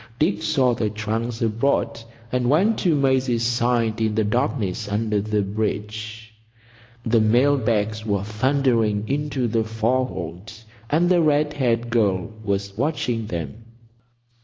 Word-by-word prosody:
Dick 160 +8 +1
saw 130 -3 +2
the 110 -2 -1
trunks 110 +2 -3
aboard, 115 +2 0 0.3
and 125 -1 +1
went 195 +10 +3
to 170 -5 +2
Maisie's 130 -4 +1
side 120 -1 +1
in 110 -1 +1
the 110 - +2
darkness 110 -3 -1
under 105 0 0
the 105 0 0
bridge. 110 +2 -4 0.7
The 115 -1 +3
mail 125 +6 +4
bags 110 -3 0
were 100 -3 -1
thundering 110 -2 +1
into 140 -3 -1
the 115 0 +1
forehold, 110 -5 -2 0.4
and 165 +4 +3
the 175 -1 +4
red 150 -1 +2
haired 120 -4 0
girl 105 -3 +1
was 100 -1 -2
watching 120 -4 -1
them. 85 +4 -5
115 Hz, 135 wpm, -23 LUFS, 105-130 Hz, 0.7 s, mail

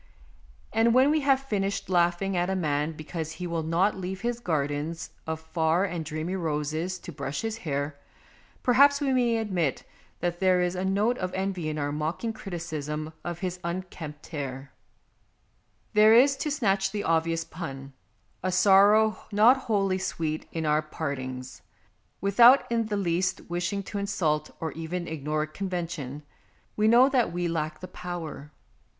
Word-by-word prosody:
And 225 +2 +3
when 265 +3 +6
we 310 - +3
have 275 -1 +3
finished 200 -7 -2
laughing 175 +2 +1
at 175 +1 +1
a 190 - 0
man 150 -3 0
because 160 +1 -5
he 180 - -6
will 170 -1 -2
not 170 +6 +1
leave 190 0 -5
his 240 0 -2
gardens 155 -3 -2 0.2
of 160 0 -2
far 160 +3 +1
and 175 -4 -3
dreamy 155 +4 -3
roses 160 +1 -2
to 175 - -9
brush 140 -1 -4
his 225 -1 -3
hair, 145 -6 -3 0.6
perhaps 280 +3 +5
we 275 -3 +1
may 240 -2 +2
admit 185 - -1 0.4
that 175 0 -2
there 185 -1 +4
is 180 0 +1
a 185 0 -3
note 205 +6 +1
of 185 -1 -2
envy 190 -4 -2
in 155 - -3
our 145 -1 -1
mocking 160 +10 -2
criticism 160 -6 -5
of 175 -1 -5
his 180 -1 -3
un 170 +2 -2
kempt 150 -3 -8
head. 140 -3 -5 1.2
There 215 +1 +7
is, 275 +4 +6
to 300 - -2
snatch 195 -9 +1
the 205 -1 -3
obvious 165 0 +1
pun, 135 -6 -7 0.5
a 185 - -1
sorrow 200 +3 +5
not 215 +5 +6
wholly 200 -7 0
sweet 160 -4 -3
in 160 -1 -3
our 150 0 +3
part 155 -2 -4
ings. 130 0 -7 0.6
Without 235 +7 +6
in 230 -2 +1
the 210 -1 -1
least 185 0 0
wishing 175 +3 -2
to 200 +1 -5
insult 155 -7 0
or 160 -1 -3
even 170 +2 -4
ignore 155 0 -2
convention, 165 -5 -5 0.5
we 215 0 +2
know 240 +4 +7
that 255 -8 +2
we 175 0 -1
lack 155 -2 -3
the 185 - -6
power. 175 -5 -7
175 Hz, 165 wpm, -27 LUFS, 155-200 Hz, 1.2 s, There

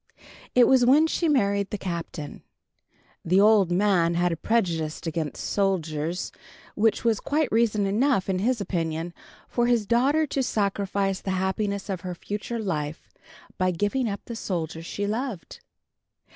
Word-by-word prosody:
It 250 -1 +7
was 260 -2 +5
when 280 +6 +6
she 325 +1 0
married 200 -7 +2
the 210 - -3
Captain. 170 -5 -5 0.8
The 185 +3 +3
old 205 -3 +5
man 175 -3 +2
had 175 +1 +2
a - - 0
prejudice 165 -6 0
against 160 -3 -3
soldiers, 170 -4 -1 0.4
which 220 +1 +1
was 230 -3 +2
quite 300 +1 0
reason 220 -2 +2
enough, 215 +1 +1
in 190 -1 0
his 240 +4 +1
opinion, 165 -3 -2 0.3
for 240 -1 0
his 235 -3 +2
daughter 270 +8 +3
to 275 -1 -1
sacrifice 200 -4 -1
the - - -5
happiness 200 +1 -1
of 190 -3 -3
her 180 -1 -5
future 210 +6 -5
life 155 -8 -4 0.5
by 185 0 +2
giving 205 +8 0
up 200 - -4
the 235 - -6
soldier 165 -7 -3
she 200 +4 -4
loved. 220 - -4
200 Hz, 150 wpm, -25 LUFS, 175-230 Hz, 0.8 s, It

